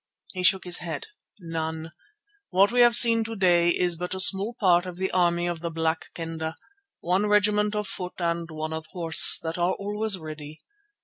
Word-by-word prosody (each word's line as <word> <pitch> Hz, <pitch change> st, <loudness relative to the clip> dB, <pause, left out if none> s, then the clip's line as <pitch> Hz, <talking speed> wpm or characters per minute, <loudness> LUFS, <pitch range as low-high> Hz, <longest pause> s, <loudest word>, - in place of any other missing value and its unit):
He 185 Hz, -, -5 dB
shook 185 Hz, +1 st, +2 dB
his 180 Hz, -1 st, -3 dB
head. 175 Hz, -, -6 dB, 0.3 s
"None. 160 Hz, -2 st, -6 dB, 0.6 s
What 195 Hz, +3 st, +2 dB
we 245 Hz, -, -1 dB
have 240 Hz, -1 st, +5 dB
seen 230 Hz, -1 st, +6 dB
to 225 Hz, 0 st, -7 dB
day 175 Hz, -3 st, +2 dB
is 175 Hz, -1 st, 0 dB
but 180 Hz, +2 st, -5 dB
a -, -, -6 dB
small 200 Hz, +4 st, +3 dB
part 180 Hz, -4 st, +2 dB
of 180 Hz, -1 st, -9 dB
the 190 Hz, +1 st, -3 dB
army 175 Hz, -1 st, 0 dB
of 175 Hz, -1 st, -4 dB
the 170 Hz, +1 st, -5 dB
Black 160 Hz, 0 st, -3 dB
Kendah, 160 Hz, -1 st, -6 dB, 0.5 s
one 185 Hz, +4 st, -1 dB
regiment 210 Hz, 0 st, +1 dB
of 210 Hz, -1 st, -3 dB
foot 180 Hz, -1 st, -7 dB
and 170 Hz, -1 st, -3 dB
one 155 Hz, 0 st, -6 dB
of 160 Hz, 0 st, -7 dB
horse, 165 Hz, -3 st, +6 dB
that 165 Hz, +1 st, -5 dB
are 175 Hz, +2 st, 0 dB
always 210 Hz, 0 st, -4 dB
ready. 155 Hz, -2 st, -10 dB
175 Hz, 190 wpm, -24 LUFS, 165-200 Hz, 0.6 s, seen